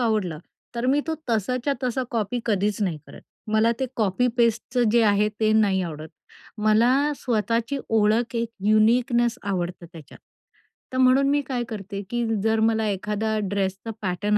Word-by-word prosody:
आवडलं, 210 -9 0 0.4
तर 235 +1 -2
मी 280 +3 +3
तो 320 - -1 0.2
तसाच्या 250 +6 0
तसा 255 +1 -1
कॉपी 230 +1 -2
कधीच 205 0 0
नाही 170 -6 -1
करत. - - -13 0.3
मला 220 +2 +3
ते 265 - +1
कॉपी 215 +2 +1
पेस्टचं 235 +1 +1
जे 235 0 +4
आहे, 210 0 +3
ते 215 0 +3
नाही 200 -4 +3
आवडत. 155 -2 -6 0.5
मला 240 +7 +3
स्वतःची 230 +3 -1
ओळख, 225 +2 +2
एक 230 0 -1 0.2
युनिकनेस 235 +2 +3
आवडतं 180 -3 -3
त्याच्यात, 160 -4 -13 0.8
तर - - -2
म्हणून 260 +2 +4
मी 290 0 +2
काय 250 -3 -2
करते, 200 -2 -6
की 240 0 -1 0.2
जर 220 0 +2
मला 220 0 +2
एखादा 210 +2 -2
ड्रेसचा 195 +2 -2
पॅटर्न 205 +2 0
220 Hz, 155 wpm, -24 LUFS, 205-240 Hz, 0.8 s, जे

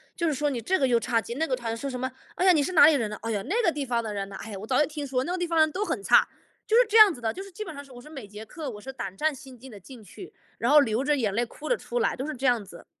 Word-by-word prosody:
就 340 -2 -1
是 300 - 0
说 295 +1 0
你 240 -3 -3
这 375 - +1
个 270 - +2
又 235 -2 +3
差 230 0 0
劲， 235 +5 -6
那 320 - +1
个 255 - 0
他 230 -2 -4
说 275 +4 -5
什 250 -1 -5
么， 260 +1 -3 0.2
哎 370 - 0
呀， 370 - +7
你 310 -4 +3
是 365 +6 -2
哪 290 - +8
里 315 - +6
人 225 -6 -1
啊， 210 - -6
哎 230 - -2
呀， 205 -2 -1
那 415 - 0
个 335 - +3
地 290 -2 -4
方 235 -3 -1
的 215 -1 -5
人 195 -1 -4
呐， 195 - -9
哎 220 - -8
呀， 195 - -6
我 215 - -9
早 255 - +2
就 300 - +4
听 295 -2 -6
说 255 -1 -1
那 350 - -4
个 370 - -1
地 350 -1 -2
方 330 -1 -1
的 - - +6
人 315 -1 +3
都 400 +6 -2
很 400 - -3
差， - - +5 0.4
就 445 - +3
是 - - +6
这 440 - -3
样 420 -3 +9
子 250 - -9
的。 225 -1 -2
就 385 - -7
是 395 -1 -10
基 425 +4 -7
本 325 - -8
上 285 0 -9
是 275 - -18
我 245 - -11
是 250 - -14
每 270 -9 -9
节 210 +2 -10
课 310 -2 -7
我 210 -3 -8
是 265 +5 -9
胆 195 -6 -7
战 310 -1 +1
心 260 -1 -12
惊 260 +1 -13
地 205 - -11
进 230 +3 -13
去， 360 - -12 0.3
然 240 +4 +1
后 300 - +8
流 230 0 0
着 295 0 +1
眼 215 -6 -1
泪 235 +3 +1
哭 300 +6 -9
了 - - +3
出 - - -6
来， - - +1
都 265 +4 -5
是 305 - -4
这 265 +2 -5
样 240 -4 +2
子。 180 -3 -14
265 Hz, 410 characters per minute, -26 LUFS, 230-315 Hz, 0.4 s, 样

